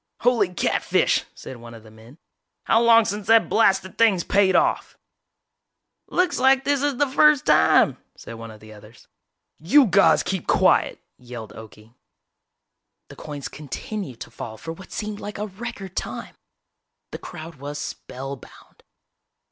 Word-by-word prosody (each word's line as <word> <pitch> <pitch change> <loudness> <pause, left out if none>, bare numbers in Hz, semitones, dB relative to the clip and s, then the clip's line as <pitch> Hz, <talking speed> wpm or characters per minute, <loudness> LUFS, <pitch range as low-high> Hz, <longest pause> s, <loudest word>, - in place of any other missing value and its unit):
"Holy 230 -6 +2
catfish!" 180 - 0
said 130 - -10
one 115 0 -12
of 110 - -14
the 110 - -16
men, 110 +6 -17 0.5
"how 225 - +3
long 230 -1 +5
since 205 -1 -4
that 225 0 +5
blasted 195 -3 +1
thing's 205 -7 +3
paid 195 -1 +2
off?" - - 0 1.1
"Looks 360 -1 0
like 265 +1 +4
this 280 0 0
is 285 -3 -1
the 290 - +3
first 290 +1 +3
time," - - +4 0.2
said - - -11
one 115 0 -9
of 110 -1 -13
the 110 0 -13
others. 105 +2 -17 0.5
"You 260 - +5
guys 200 -2 +4
keep 190 -3 -4
quiet!" - - +2 0.2
yelled 120 -3 -10
Okie. 110 0 -14 1.2
The - - -12
coins 145 -2 -7
continued 150 - -7
to - - -8
fall 110 -1 -8
for 165 +8 -7
what 190 +3 -14
seemed 210 -1 -5
like 205 - -7
a 210 - -3
record 205 -2 -8
time. - - -6 0.8
The - - -7
crowd 160 -1 -10
was 145 +2 -7
spellbound. 135 -1 -9
185 Hz, 150 wpm, -23 LUFS, -, 1.2 s, long